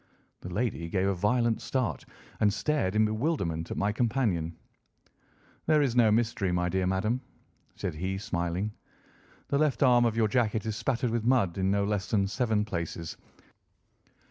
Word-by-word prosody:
The 90 - -8
lady 95 -4 -2
gave 95 +1 0
a 100 - +2
violent 115 +5 +1
start 115 - -2 0.3
and 105 -1 +4
stared 105 -4 0
in 110 0 +4
bewilderment 110 - -1
at - - -4
my 100 +1 +1
companion. 105 -9 0 1.1
"There 155 -1 +4
is 125 -4 0
no 115 -3 +5
mystery, 110 -4 +1
my 90 0 0
dear 95 +1 0
madam," 110 +7 0 0.5
said - - -3
he, 95 +5 -3
smiling. 90 +1 -2 0.8
"The 140 - +1
left 150 -2 +2
arm 120 -2 +5
of 115 -1 0
your 110 -1 +3
jacket 110 -1 0
is 110 -2 -2
spattered 125 0 -1
with 115 -1 -1
mud 115 -8 +2
in 95 0 +1
no 100 0 +2
less 100 -1 -1
than 100 -3 +2
seven 110 0 0
places. 85 -3 -4
105 Hz, 165 wpm, -29 LUFS, 95-120 Hz, 1.1 s, no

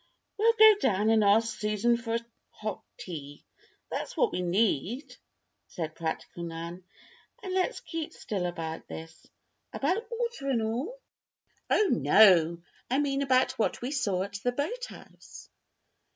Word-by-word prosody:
"We'll 450 +2 +4
go 435 -1 +9
down 215 - +2
and 220 -1 +4
ask 215 +2 +3
Susan 215 +3 +2
for 230 -1 -2 0.3
hot 215 -2 -5 0.2
tea. 145 -5 -8 0.5
That's - - -4
what - - +3
we 180 - -2
need," 220 - 0 0.5
said 160 -4 -5
practical 165 +1 -5
Nan. 170 +2 -6 0.6
"And 375 - -4
let's 375 +6 0
keep 325 -2 -5
still 190 -4 -3
about 165 -2 -5
this." 160 0 -10 0.4
"About 375 +11 -1
Walter 470 - -3
and 235 -4 +1
all?" 260 - -3 0.7
"Oh, 425 - +4
no! 170 +1 +5 0.3
I 260 - +2
mean 280 -1 +1
about 255 -3 +2
what 225 - 0
we 255 - -2
saw 200 -10 0
at 200 +1 -6
the 245 - +2
boathouse." 460 - -7
220 Hz, 135 wpm, -29 LUFS, 180-280 Hz, 0.7 s, go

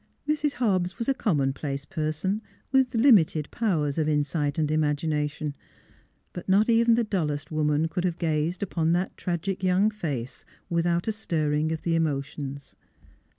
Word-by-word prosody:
Mrs. 300 -1 +1
Hobbs 185 -7 0
was 230 - -3
a 275 - +3
commonplace 140 - -1
person, 165 +4 -2 0.3
with 265 -2 +3
limited 205 - +4
powers 160 -10 0
of 155 -1 +1
insight 150 -1 0
and 155 -2 +1
imagination, 150 -1 0 0.8
but 175 +1 -7
not 200 +3 +4
even 230 0 +5
the 235 - +2
dullest 155 -10 -2
woman 155 0 +1
could 180 +2 -3
have 175 -2 -1
gazed 160 +2 -1
upon 165 -3 0
that 180 +2 -1
tragic 180 +1 -3
young 190 +3 +3
face 145 - -5 0.3
without 170 +1 +1
a - - +2
stirring 155 -7 -1
of 160 -1 -4
the 170 - 0
emotions. 140 -3 -3
165 Hz, 150 wpm, -26 LUFS, 150-195 Hz, 0.8 s, even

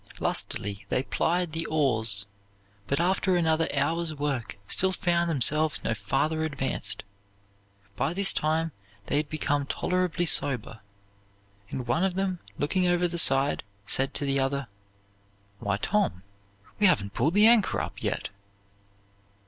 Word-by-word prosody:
Lustily 100 0 -1
they 130 - 0
plied 175 +4 0
the 165 +1 -3
oars, 115 -9 +3 0.6
but 140 - 0
after 185 +1 +1
another 165 -1 +1
hour's 165 -1 -1
work 140 -7 -3
still 190 0 +2
found 170 -2 0
themselves 150 +2 +2
no 115 - 0
farther 135 +10 -1
advanced. 135 -7 -2 0.9
By 140 +9 -1
this 195 0 +4
time 160 +1 0 0.3
they 145 - 0
had 150 -1 -1
become 145 -2 -1
tolerably 180 +1 -1
sober; 125 -8 +1 0.9
and 125 - -5
one 120 +9 0
of 190 -2 0
them, 190 -2 -1 0.2
looking 180 +5 0
over 175 0 +2
the 170 0 -2
side, 135 -1 +3 0.2
said 135 +6 +2
to 145 - -1
the 140 0 +1
other, 135 +1 -1 0.9
"Why, 100 -1 -1
Tom, 190 - -1 0.6
we 205 - +5
haven't 100 - +1
pulled 155 - 0
the 210 +1 +6
anchor 230 -3 +4
up - - -6
yet." - - -2
155 Hz, 140 wpm, -27 LUFS, 135-175 Hz, 0.9 s, the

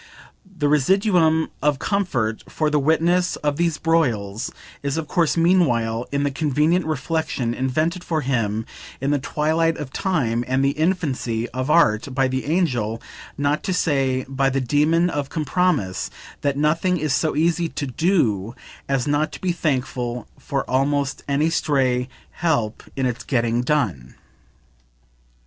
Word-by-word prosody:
The 180 -7 -3
residuum 160 - +3
of 150 -1 +2
comfort 130 - -1
for 155 -1 0
the 150 - +3
witness 170 +5 +2
of 145 -1 -2
these 170 -2 +1
broils 115 -11 0 0.3
is 140 +2 -2
of 160 -2 -3
course 170 -1 +1
meanwhile 125 -10 +2
in 140 0 0
the 145 - 0
convenient 155 +4 +1
reflexion, 140 -4 -1
invented 155 +8 -1
for 160 -2 -1
him 115 -5 -1 0.3
in 135 +2 0
the 145 - +2
twilight 160 +4 0
of 140 -3 -7
time 125 -11 0
and 130 +1 +1
the 140 - +3
infancy 140 -9 -1
of 130 +2 -3
art 130 -5 +3
by 135 0 +3
the 130 0 -2
Angel, 125 - 0 0.4
not 145 +1 +1
to 185 - -2
say 135 -6 +1
by 135 0 +1
the 135 +1 0
Demon, 150 +6 +2
of 145 -5 -3
Compromise, 155 - 0 0.3
that 140 -1 0
nothing 165 +5 +2
is 155 -3 -1
so 155 -3 +1
easy 165 +2 +1
to 145 - -4
"do" 125 - 0 0.3
as 135 -3 +1
not 145 +2 +1
to - - -7
be 185 - 0
thankful 125 -6 -2
for 135 -1 -3
almost 140 +1 0
any 145 +3 +1
stray 130 -6 +1 0.2
help 135 -11 -1
in 135 - 0
its 125 -2 -2
getting 120 -2 +1
done. 115 - -1
145 Hz, 150 wpm, -22 LUFS, 125-165 Hz, 0.4 s, residuum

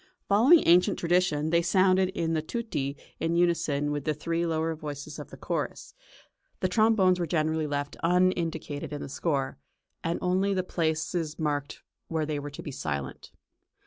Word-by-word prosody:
Following 245 +12 +6
ancient 180 +4 +5
tradition 170 -3 +1
they 170 0 +4
sounded 185 +1 +3
in 165 -1 0
the 155 - +1
tutti 155 - -3 0.2
in 165 +1 0
unison 165 -4 +1
with 145 -1 -2
the 155 0 -1
three 170 +3 -1
lower 160 0 0
voices 145 -2 -7
of - - -8
the - - -11
chorus; - - -4 0.7
the 185 - +1
trombones 190 -2 +3
were 170 - -1
generally 155 -1 0
left 145 0 -3
unindicated 165 -4 0
in 145 - -4
the - - -6
score, 135 - -2 0.4
and 165 +1 0
only 190 +2 +1
the 185 - 0
places 160 -1 -1
marked 145 -3 -2 0.2
where 160 -2 -1
they 150 -1 -2
were 145 +1 -6
to 145 - -9
be 145 - -6
silent. 70 - -5
165 Hz, 165 wpm, -28 LUFS, 150-180 Hz, 0.7 s, Following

